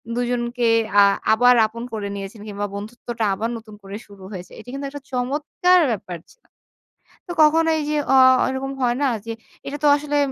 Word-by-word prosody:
২ 245 - 0
জনকে 240 0 -1 0.3
আ - - +9 0.3
আবার 245 +2 +5
আপন 230 +2 -8
করে 210 -2 -3
নিয়েছেন 200 +2 -8
কিংবা 205 0 -4
বন্ধুত্বটা 230 +3 -6
আবার 220 +4 -2
নতুন 220 -2 -13
করে 195 +1 -8
শুরু 200 -2 -15
হয়েছে। 185 -3 -8
এটি - - -12
কিন্তু 275 +1 -5
একটা 290 +1 -9
চমৎকার 295 +8 +1
ব্যাপার 185 -5 -5
ছিল। - - -26 0.8
তো - - -5
কখনো 325 +2 +4
এই - - -2
যে 300 - 0 0.2
অ - - +6 0.3
এরকম 265 +1 -4
হয় 240 -1 +2
না 285 - +3 0.2
যে, 230 - -4 0.4
এটা 280 +1 -4
তো - - +5
আসলে 295 0 -2
240 Hz, 185 wpm, -21 LUFS, 210-285 Hz, 0.8 s, আ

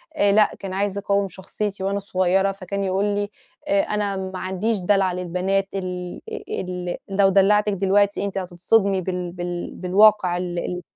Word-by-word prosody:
آآ 200 0 +3
لأ 210 0 +4
كان 195 -1 -6
عايز 200 +1 -1
يقوِّم 200 0 +1
شخصيتي 195 +2 -5
وأنا 200 +1 0
صغيّرة 190 0 +1
فكان 195 0 -4
يقول 190 +1 0
لي: 205 0 -1 0.4
"آآ 200 0 +3
أنا 205 -1 -1
ما 190 -1 -5
عنديش 190 +4 -1
دلع 190 0 +2
للبنات 180 +2 -1
ال 180 -2 -4 0.4
ال 180 -1 -4
لو 195 0 +4
دلّعتِك 205 +2 +4
دلوقتي 200 +1 +2
أنتِ 195 -1 -4
هتتصدمي 190 +2 +1
بال 180 -1 -3
بال 175 0 -5
بالواقع 185 -1 +4
ال 175 -1 -3
ال" 180 +1 -4
195 Hz, 160 wpm, -23 LUFS, 180-200 Hz, 0.4 s, لأ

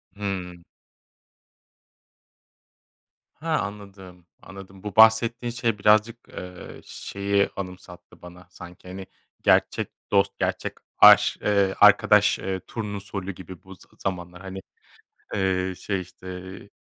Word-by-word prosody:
Hıı. 95 -3 -4 2.8
Ha, 160 0 -2
anladım, 100 -3 -9 0.2
anladım. 95 -1 -13
Bu 105 -3 -6
bahsettiğin, 115 +2 +4
şey, 115 -2 -1
birazcık, 110 +3 +3
eee, 90 0 -10
şeyi 100 0 -1
anımsattı 90 -2 -10
bana 90 +1 -13
sanki, 90 0 -13
hani, 95 +1 -8 0.3
gerçek - - +2 0.2
dost, 100 -1 +2
gerçek - - -2 0.3
aş - - +7
eee, 100 -2 +2
arkadaş - - +5 0.3
turnusolü 100 -3 -5
gibi 95 -1 -11
bu 95 0 -12
z - - -27 0.2
zamanlar, 90 -1 -5
hani, 95 0 -7 0.7
eee, 95 -1 0
şey, 95 -2 -3
işte, 90 +1 -14
eee, 95 +2 -11
95 Hz, 105 wpm, -24 LUFS, 90-105 Hz, 2.8 s, aş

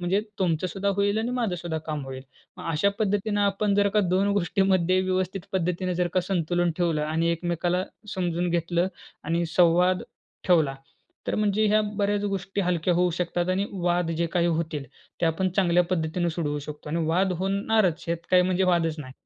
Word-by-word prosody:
म्हणजे 180 +3 +1 0.2
तुमचंसुद्धा 185 +2 0
होईल 200 +1 +2
आणि 225 +2 -1
माझंसुद्धा 175 -7 -2
काम 150 -3 -3
होईल." 135 0 -7 0.4
मग 165 - -5
अशा 165 +6 +2
पद्धतीनं 205 0 0
आपण 200 0 +1
जर 200 0 +3
का 210 - +5
2 190 +1 +1
गोष्टीमध्ये 185 -1 +2
व्यवस्थित 185 +1 -1
पद्धतीनं 180 0 -1
जर 175 0 0
का 185 - +4
संतुलन 175 -1 0
ठेवलं 165 -4 +1
आणि 160 +2 0
एकमेकाला 175 +2 -1 0.3
समजून 175 -2 -1
घेतलं 170 +1 +1 0.4
आणि 170 +2 0
संवाद 180 +2 +3 0.4
ठेवला 160 -7 +3 0.5
तर - - 0
म्हणजे 210 0 +2
ह्या 215 +1 +4 0.2
बऱ्याच 205 0 +1
गोष्टी 195 0 -2
हलक्या 175 -1 +1
होऊ 180 0 +2
शकतात 175 0 -1
आणि 195 +2 0
वाद 175 -2 0
जे 170 - +1
काही 175 -1 +2
होतील, 160 -4 -1 0.4
ते 170 - +3
आपण 175 +4 +1
चांगल्या 180 -2 +4
पद्धतीने 170 0 0
सोडवू 150 -3 -2
शकतो 150 +1 -8
आणि 165 +2 -1
वाद 180 +4 +2
होणारच 195 -2 +1
हेत 170 - +1
काही 180 0 +6
म्हणजे 185 +1 +1
वादच 170 -3 +2
नाही. 130 -3 -8
180 Hz, 170 wpm, -26 LUFS, 170-195 Hz, 0.5 s, काही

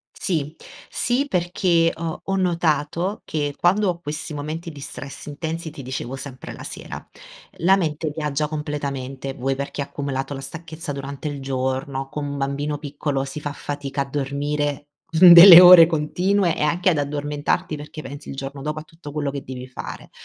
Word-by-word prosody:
Sì. 155 -4 -2 0.3
Sì 250 +4 0
perché 175 -3 +2
ho 165 -1 -5
ho 195 0 -1
notato 170 +1 0
che 145 -2 -2
quando 195 +4 +2
ho 170 -1 -2
questi 150 -1 -5
momenti 155 +3 -5
di 145 -2 -11
stress 135 0 -8
intensi 160 +2 -5
ti 145 -3 -10
dicevo 130 0 -5
sempre 130 -1 -8
la - - -10
sera. - - -8 0.5
La 190 +3 +4
mente 155 -4 -2
viaggia 150 -1 -1
completamente, 140 -3 -4
vuoi 135 +2 -1
perché 140 +1 -5
ha - - -1
accumulato 140 -1 -4
la 135 - -6
stanchezza 155 +2 -7
durante 140 +1 -5
il 145 -1 -6
giorno 135 0 -2
con 150 0 -4
un 140 0 -4
bambino 140 +2 -2
piccolo 145 -2 -3
si 140 +2 -7
fa 145 -1 -4
fatica 140 -1 -4
a - - -4
dormire 145 +1 -2 0.2
delle 175 +1 +11
ore 175 -2 +10
continue 175 +3 +1
e - - -7
anche 170 +5 +2
ad 160 - 0
addormentarti 145 +3 -2
perché 150 +1 -9
pensi 145 +1 -9
il - - -5
giorno 135 +1 -6
dopo 150 +2 -3
a - - -9
tutto 160 -1 -12
quello 145 -2 -2
che 140 -1 -5
devi 130 -1 -7
fare. 125 - -8
150 Hz, 175 wpm, -22 LUFS, 140-165 Hz, 0.5 s, delle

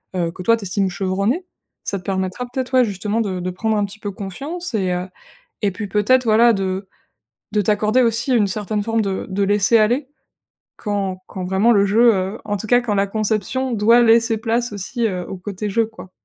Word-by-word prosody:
heu 170 -2 0
que 185 +2 -9
toi 230 +4 +4
tu 225 - -9
estimes 195 +1 0
chevronné. 195 - -1 0.4
Ça 200 - -2
te - - -17
permettra 190 +5 -2
peut-être, 260 0 -4
ouais, 255 -1 +5
justement, 205 +1 -2
de 190 -4 -2
de 180 - -2
prendre 220 +4 -1
un 205 - +1
petit 200 +2 -11
peu 205 -1 -4
confiance 275 - -6
et 190 -4 0
heu, 180 +1 -2 0.6
et 205 - +2
puis 205 +3 -5
peut-être, 215 +6 +3
voilà, 230 +1 +5
de 190 0 -3 0.7
de 210 - +3
t'accorder 210 +4 +2
aussi 235 +3 +1
une 210 -4 +3
certaine 210 +1 -2
forme 225 +1 0
de 195 -2 -3
de 195 +1 0
laisser 205 +3 +3
aller 240 +6 +2 0.7
quand 200 -3 -2
quand 190 - -7
vraiment 190 +6 +3
le 200 -3 +4
jeu, 225 +3 +5
heu, 190 +3 -2
en 205 -1 -2
tout 220 - -6
cas 245 +1 +5
quand 225 -4 -1
la 200 0 +2
conception 220 +5 -1
doit 230 +2 +5
laisser 230 -1 +4
place 230 +1 -1
aussi, 225 +4 -2
heu, 180 -3 -4
au - - -5
côté 200 +2 -5
jeu, 225 +3 +2
quoi. 220 -4 -13
210 Hz, 210 wpm, -20 LUFS, 195-230 Hz, 0.7 s, ouais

